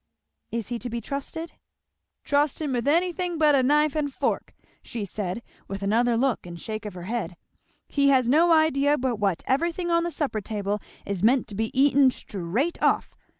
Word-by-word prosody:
"Is 230 -2 -4
he 240 -1 -3
to 245 - -5
be 235 0 -3
trusted?" 280 +7 -5 0.7
"Trust 285 0 +1
him 295 -4 -2
with 245 +1 -1
anything 350 +2 +1
but 305 -2 +4
a 275 - +5
knife 295 +3 +3
and 295 -2 -1
fork," - - -2 0.3
said 205 -2 -4
she, - - -32
with 195 0 -5
another 230 +4 +2
look 255 -1 +1
and 170 -1 -8
shake 215 +2 -5
of 205 - -7
the 175 - -7
head. 195 -5 -3 0.5
"He 280 -1 +2
has 260 -3 +4
no 325 +7 +4
idea 295 -2 +4
but 250 -3 -1
what 195 -5 0
everything 340 +5 0
on 335 0 +4
the 345 - -1
supper 280 -8 -2
table 205 -1 -2 0.3
is 200 -3 -3
meant 240 +4 +3
to 205 - -7
be 220 +2 -1
eaten 275 -1 +6
straight 215 - -3
off. - - +1
260 Hz, 190 wpm, -25 LUFS, 215-300 Hz, 0.7 s, eaten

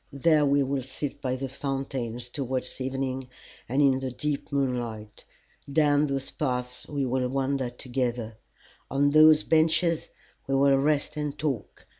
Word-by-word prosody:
There 150 +1 +3
we 140 0 +3
will 135 0 -1
sit 140 +2 -6
by 130 -2 -1
the 135 +1 -4
fountain 135 -3 -3
towards 125 +1 -3
evening 130 0 -3 0.4
and 135 +4 +3
in 135 -2 +4
the 135 -1 -3
deep 145 +4 -3
moonlight. 120 -6 -3 0.5
Down 145 0 +3
those 135 -1 -2
paths 125 -4 -2
we 145 -2 -2
will 125 0 0
wander 135 -1 -1
together. 120 -3 -3 0.5
On 140 +1 +2
those 155 +1 +7
benches 160 +1 +2 0.4
we 135 - +1
will 135 0 +5
rest 150 +1 0
and 150 -1 -3
talk. 140 -9 -4
135 Hz, 145 wpm, -27 LUFS, 125-145 Hz, 0.5 s, those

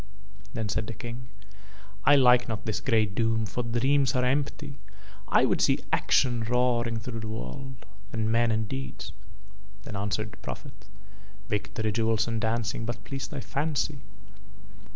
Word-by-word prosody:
Then 110 -2 -1
said 105 +1 -1
the 115 - -5
King: 120 +1 -7 0.8
"I 145 - +8
like 125 -3 +6
not 110 -1 -3
this 110 - -1
grey 115 -4 +3
doom, 110 +2 +1
for 125 - -2
dreams 130 +4 +2
are 125 0 +3
empty. 140 +1 -1 0.5
I - - +5
would - - +1
see - - +4 0.2
action 120 -3 +3
roaring 120 -1 +2
through 115 +1 -5
the 110 - -5
world, 110 - -6 0.3
and 110 -1 0
men 115 +1 +3
and 110 -1 +1
deeds." 65 -7 -5 0.7
Then 105 - -7
answered 105 +1 -1
the - - -13
Prophet: - - -8 0.6
"Victory, 110 +1 -1
jewels 110 +1 +2
and 115 -1 -1
dancing 115 0 0
but 120 +1 -4
please 135 -1 -4
thy 140 - -5
fancy. 150 +1 -1
115 Hz, 155 wpm, -28 LUFS, 110-125 Hz, 0.8 s, I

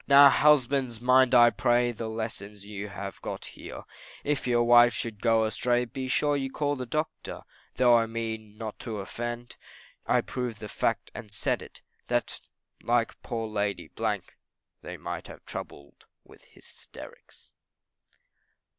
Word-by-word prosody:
Now 140 0 +9
husbands 135 -5 +3
mind 130 +1 +5
I 120 -1 +8
pray, 120 +1 +2
The 115 -1 -5
lesson 110 -2 -5
you 100 0 -7
have 100 -1 -7
got - - -5
here, - - -9 0.4
If 145 -2 -1
your 120 -1 +3
wives 120 0 +6
should 110 -3 -4
go 115 -1 +4
astray, 120 +3 +1
Be 130 +2 -5
sure 145 +3 +2
you 135 -1 -1
call 145 +1 -1
the 130 -2 -5
doctor. 155 +5 -3 0.3
Though 125 -1 +5
I 115 -1 +3
mean 110 -2 -5
not 110 -2 -6
to 110 -3 -5
offend, 120 +5 -5 0.5
I've - - +2
proved 125 -4 -4
the 105 - -6
fact, - - -1
and 110 -3 -9
said 100 - 0
it, - - -13 0.2
That - - -1 0.4
like 120 -1 0
poor 115 -3 -3
Lady, 100 -6 -2 0.9
They - - -7
might - - -6
be - - -9
troubled 70 0 -9 0.2
with - - -19
hysterics. - - -14
120 Hz, 145 wpm, -28 LUFS, 110-125 Hz, 0.9 s, Now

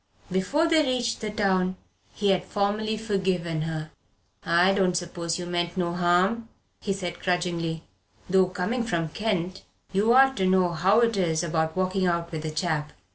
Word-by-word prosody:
Before 230 - +1
they 325 -1 +4
reached 250 -3 -1
the 215 - -3
town 190 -3 +1 0.4
he 200 -1 +1
had 185 -2 +1
formally 210 +3 -1
forgiven 190 -6 -1
her. 155 -1 -4 0.5
"I 175 +3 +4
don't 185 -3 +2
suppose 170 -1 -3
you 180 - -5
meant 175 +1 -2
no 170 -1 0
harm," 180 +6 +1 0.3
he 200 - -2
said 185 -3 -4
grudgingly; 170 -3 -1 0.4
"though 190 0 +4
coming 185 +7 -2
from 170 -8 -1
Kent 190 -1 -2 0.3
you 205 +4 +3
ought 265 +2 +6
to 190 -1 +1
know 185 -1 +3
how 190 +7 +3
it 230 -3 +2
is 165 -4 +1
about 160 -1 -1
walking 185 0 +1
out 170 -1 -1
with 160 -2 -4
a - - -1
chap. 155 -1 -2
185 Hz, 170 wpm, -26 LUFS, 170-205 Hz, 0.5 s, ought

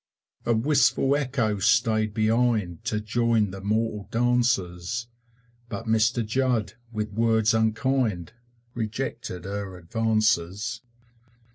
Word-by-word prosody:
A 120 - +3
wistful 135 +2 +3
Echo 125 -7 0
stayed 110 0 +2
behind 110 -5 +1
To 105 - 0
join 110 -1 +1
the 95 0 -8
mortal 105 0 -1
dances, 115 -4 0 0.6
But 100 - -5
Mr 110 +1 +2
Judd, 120 -1 0 0.2
with 105 -2 -3
words 110 0 +3
unkind, 110 -4 0 0.4
Rejected 110 -5 -4
her 100 -1 -5
advances. 110 +2 0
110 Hz, 100 wpm, -25 LUFS, 105-120 Hz, 0.6 s, A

